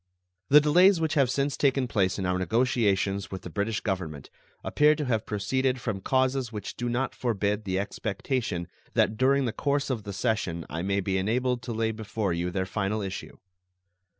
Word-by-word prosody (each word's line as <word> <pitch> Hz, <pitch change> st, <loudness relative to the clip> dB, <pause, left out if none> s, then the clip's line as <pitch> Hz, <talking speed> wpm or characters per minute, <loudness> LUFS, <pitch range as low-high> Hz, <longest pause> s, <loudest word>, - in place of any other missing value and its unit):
The 150 Hz, -, +9 dB
delays 175 Hz, +5 st, +5 dB
which 160 Hz, -1 st, 0 dB
have 140 Hz, -5 st, +3 dB
since 140 Hz, +2 st, 0 dB
taken 135 Hz, -2 st, +2 dB
place 95 Hz, -5 st, +1 dB
in 95 Hz, -, -2 dB
our 90 Hz, 0 st, 0 dB
negotiations 100 Hz, -3 st, +1 dB
with 95 Hz, -, -7 dB
the 90 Hz, -, -7 dB
British 105 Hz, +4 st, -1 dB
Government 85 Hz, -, -4 dB, 0.3 s
appear 150 Hz, +1 st, +4 dB
to 150 Hz, -, -3 dB
have 110 Hz, -4 st, -1 dB
proceeded 125 Hz, +5 st, 0 dB
from 110 Hz, -5 st, -3 dB
causes 130 Hz, +1 st, +1 dB
which 105 Hz, -2 st, -6 dB
do 120 Hz, 0 st, -3 dB
not 125 Hz, +3 st, -1 dB
forbid 105 Hz, -3 st, -1 dB
the 95 Hz, -1 st, -1 dB
expectation 100 Hz, -, -2 dB, 0.3 s
that 110 Hz, -, +3 dB
during 135 Hz, +3 st, +3 dB
the 115 Hz, -, -2 dB
course 140 Hz, -1 st, 0 dB
of 120 Hz, -4 st, -2 dB
the 100 Hz, -1 st, -7 dB
session 95 Hz, -5 st, -1 dB
I 80 Hz, -, -3 dB
may 100 Hz, +2 st, 0 dB
be 95 Hz, 0 st, 0 dB
enabled 125 Hz, +5 st, 0 dB
to 125 Hz, -, -6 dB
lay 110 Hz, 0 st, 0 dB
before 110 Hz, -3 st, -2 dB
you 85 Hz, +1 st, -1 dB
their 95 Hz, +1 st, -1 dB
final 105 Hz, +2 st, -1 dB
issue. 95 Hz, -1 st, -6 dB
110 Hz, 185 wpm, -27 LUFS, 95-130 Hz, 0.3 s, The